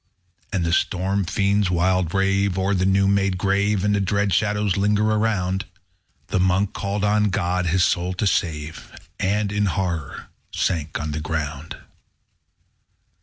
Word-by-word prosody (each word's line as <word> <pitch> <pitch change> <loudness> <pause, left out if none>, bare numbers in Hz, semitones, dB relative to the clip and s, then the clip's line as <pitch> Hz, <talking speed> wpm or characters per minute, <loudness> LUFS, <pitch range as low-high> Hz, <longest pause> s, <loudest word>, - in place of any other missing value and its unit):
And 95 -5 0
the 85 - 0
storm 95 +2 0
fiends 100 +2 +1
wild 90 -1 +1
rave 95 0 +1
O'er 95 +1 +1
the 95 -1 +1
new 95 0 +3
made 100 -1 +1
grave, 100 +1 +1
And 105 -1 +1
dread 100 0 0
shadows 105 -2 +1
linger 105 +1 +2
around. 100 -3 0 0.6
The - - 0
Monk 95 +2 +1
called 100 0 -3
on 105 +1 +3
God 90 -2 0
his 85 +2 +2
soul 90 +1 0
to 100 - -1
save, 80 -4 -2 0.3
And, 100 +1 0
in 105 0 +1
horror, 85 -6 -3 0.2
sank 80 -4 -1
on 75 0 -3
the 75 +1 -3
ground. 75 -1 -4
95 Hz, 145 wpm, -22 LUFS, 90-100 Hz, 0.6 s, new